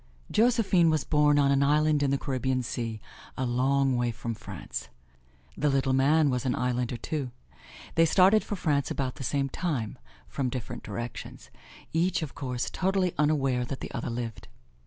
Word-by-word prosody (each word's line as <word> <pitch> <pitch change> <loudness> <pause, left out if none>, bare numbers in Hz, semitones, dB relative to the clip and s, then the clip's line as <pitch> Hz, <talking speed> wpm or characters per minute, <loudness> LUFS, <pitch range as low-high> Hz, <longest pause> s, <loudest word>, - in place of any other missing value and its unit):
Josephine 215 -7 +4
was 155 -3 +1
born 150 -1 +3
on 140 -1 +4
an 140 0 +3
island 150 +1 +3
in 140 - +2
the 140 - +2
Caribbean 130 -2 -1
Sea, 115 -2 -4 0.4
a 130 - 0
long 130 +2 +2
way 120 0 +1
from 115 0 -4
France. 100 -6 -7 0.7
The 150 - +1
Little 135 -1 +1
Man 145 +2 +4
was 125 -1 -1
an 130 - 0
islander, 125 -1 -1
too. 140 +2 -3 0.6
They 165 - +5
started 195 +5 +5
for 205 - -4
France 145 -6 0
about 130 -2 -3
the - - -6
same 140 +1 0
time, 135 - -3 0.3
from 130 -2 -2
different 120 -1 -5
directions 120 0 -7 0.4
each, 170 +1 +1
of 150 - -6
course, 125 -2 -3
totally 190 -1 +1
unaware 135 -5 +2
that 130 +2 -5
the - - -6
other - - -4
lived. 115 -2 -5
135 Hz, 170 wpm, -28 LUFS, 125-155 Hz, 0.7 s, They